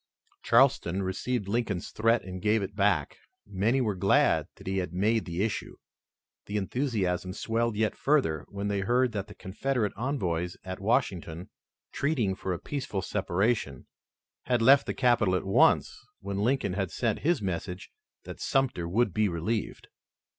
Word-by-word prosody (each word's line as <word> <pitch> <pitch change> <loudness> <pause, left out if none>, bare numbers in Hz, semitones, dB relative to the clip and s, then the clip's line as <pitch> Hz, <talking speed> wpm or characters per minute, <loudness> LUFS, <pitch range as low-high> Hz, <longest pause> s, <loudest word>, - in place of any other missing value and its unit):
Charleston 115 -7 +3
received 100 +4 -2
Lincoln's 105 -4 -2
threat 115 +2 +2
and 95 -1 -7
gave 105 +1 +2
it 100 +1 -6
back. 100 -8 +1 0.3
Many 105 +7 +1
were 110 -4 0
glad 95 +1 +3
that - - -15
he 95 0 -1
had 90 -2 -4
made 110 +5 +1
the 85 +2 -2
issue. 110 - -3 0.7
The 105 - -2
enthusiasm 95 -5 -1
swelled 115 +2 -1
yet 110 0 0
further, 135 - +1
when 100 0 -4
they 100 -1 0
heard 120 +5 +2
that 100 -2 -4
the 105 - -12
Confederate 110 +3 -2
envoys 90 - -2
at 95 0 -6
Washington, 95 -6 -1 0.4
treating 130 -9 0
for 95 0 -4
a 90 - -1
peaceful 130 -8 -4
separation, 95 - -1 0.6
had 125 -1 +2
left 135 +3 +6
the - - -2
capital 120 -7 +3
at 90 - -2
once 95 - +3 0.2
when 100 0 -4
Lincoln 110 -3 +1
had 95 -1 -1
sent 115 +2 -1
his 170 +3 +1
message 95 0 -4 0.3
that - - -9
Sumter 130 -11 0
would 110 +1 +1
be 105 +1 +2
relieved. 90 +6 -3
100 Hz, 155 wpm, -28 LUFS, 95-120 Hz, 0.7 s, left